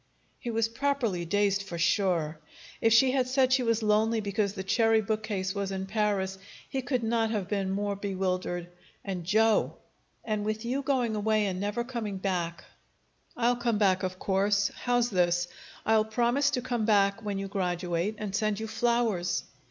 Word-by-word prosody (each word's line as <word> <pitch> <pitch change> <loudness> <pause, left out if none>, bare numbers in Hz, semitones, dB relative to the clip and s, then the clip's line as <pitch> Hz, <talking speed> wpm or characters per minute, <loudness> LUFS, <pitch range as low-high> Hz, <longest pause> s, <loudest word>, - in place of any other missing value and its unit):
He 240 - -5
was 225 -1 +1
properly 230 -7 -1
dazed, 200 +2 +1
for 180 -3 -6
sure. 170 -3 +1 0.4
If 225 - +4
she 255 +4 +6
had 260 -1 +1
said 260 0 +3
she 260 - +4
was 230 -2 +1
lonely 215 +2 +2
because 205 -1 -1
the 190 -2 -5
cherry 225 +3 +3
bookcase 210 -3 -2
was 200 -1 -3
in 190 0 -3
Paris, 195 -2 -1 0.3
he 270 - -2
could 250 -1 -1
not 225 0 +1
have 210 -5 -2
been 195 -1 -1
more 200 +1 -1
bewildered. 185 -3 -2 0.4
And 185 -4 -4
Joe! 220 +3 +3 0.5
"And 215 -2 -1
with 215 +2 -3
you 260 +4 -1
going 255 -5 0
away 215 0 +1
and 185 -2 -2
never 205 +4 -1
coming 235 -5 -4
back 180 -3 -2 0.4
" - - -41 0.3
"I'll 240 0 +2
come 240 -3 0
back, 190 -3 +3
of 185 -1 -3
course. 200 +1 +1
How's 245 -1 0
this? 175 -1 +2 0.4
I'll 220 -1 +4
promise 240 +5 +2
to - - -1
come 240 -3 -1
back 200 -1 +3
when 205 -2 -2
you 195 0 -3
graduate, 180 0 -1
and 205 -2 -4
send 215 0 0
you 220 - -3
flowers." 225 -5 0
210 Hz, 175 wpm, -28 LUFS, 190-230 Hz, 0.5 s, she